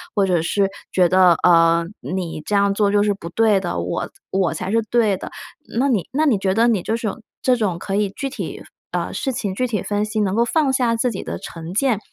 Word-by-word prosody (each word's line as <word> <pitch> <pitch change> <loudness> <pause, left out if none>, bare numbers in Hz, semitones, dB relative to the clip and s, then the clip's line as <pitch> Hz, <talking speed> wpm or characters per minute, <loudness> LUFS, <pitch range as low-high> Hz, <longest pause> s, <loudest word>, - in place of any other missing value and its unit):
或 200 -2 +3
者 180 -3 +1
是 195 +4 +1 0.2
觉 180 -2 +4
得， 185 -1 +6
呃， 170 -1 +5 0.2
你 180 -4 -4
这 210 - -1
样 200 0 +3
做 205 0 +2
就 205 0 +3
是 205 -1 +2
不 195 -4 -9
对 215 +1 +3
的， 175 -2 -3
我 170 - -3 0.2
我 190 -3 +1
才 175 +4 -4
是 230 +1 +3
对 220 -5 +3
的。 - - -8 0.5
那 275 +2 +2
你 215 -9 0
那 305 +4 +1
你 240 -7 +3
觉 190 -1 0
得 230 +4 +3
你 215 -7 +1
就 225 - -1
是 230 -1 -3
这 - - +1
种 240 - -13 0.2
这 255 - +4
种 195 -7 -1
可 195 - -3
以 205 -1 +1
具 275 +7 -4
体， 275 - -6 0.3
呃， - - -2
事 270 - -2
情 205 -5 -3
具 255 - 0
体 215 -6 -2
分 205 0 -1
析， 215 +1 -3
能 195 -1 0
够 235 +1 +3
放 290 +2 +1
下 245 -3 +1
自 240 +2 +1
己 195 - -5
的 - - -5
成 165 +1 -8
见， 235 0 +1
205 Hz, 265 characters per minute, -21 LUFS, 185-230 Hz, 0.5 s, 得